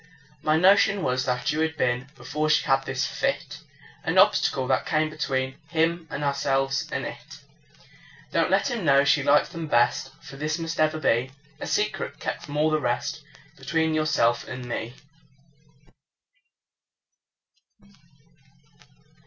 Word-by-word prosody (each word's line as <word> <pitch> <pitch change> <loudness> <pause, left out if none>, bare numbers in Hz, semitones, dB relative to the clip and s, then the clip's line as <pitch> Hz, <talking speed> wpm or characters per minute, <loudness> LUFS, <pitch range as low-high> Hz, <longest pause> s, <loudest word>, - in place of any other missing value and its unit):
My 155 +1 +2
notion 195 +2 +4
was 130 0 0
that 125 -1 0
you 150 - -2
had 160 0 -1
been 125 +1 0
(Before 155 0 -2
she 155 - +3
had 135 0 +2
this - - -1
fit) - - -2 0.4
An - - -1
obstacle 130 -1 +4
that - - +1
came 155 0 +1
between 130 -3 -2
Him 165 0 0
and 150 - -4
ourselves 140 -1 0
and - - -2
it. - - -9 0.9
Don't - - +1
let - - +2
him 235 -5 -3
know 140 -2 +5
she 145 +1 +3
liked 145 +2 +3
them 165 -1 -5
best, 120 0 +2
For 145 -2 -11
this 150 +2 -2
must 165 -1 -5
ever 155 0 +2
be 125 -3 +1 0.3
A - - -5
secret, 210 -2 -2
kept - - -4
from 145 0 -6
all 155 +1 +2
the 155 - +2
rest, 120 -2 -2 0.4
Between 160 -1 0
yourself 150 -7 +1
and 130 -1 -7
me. 120 0 -5
150 Hz, 145 wpm, -25 LUFS, 130-160 Hz, 0.9 s, know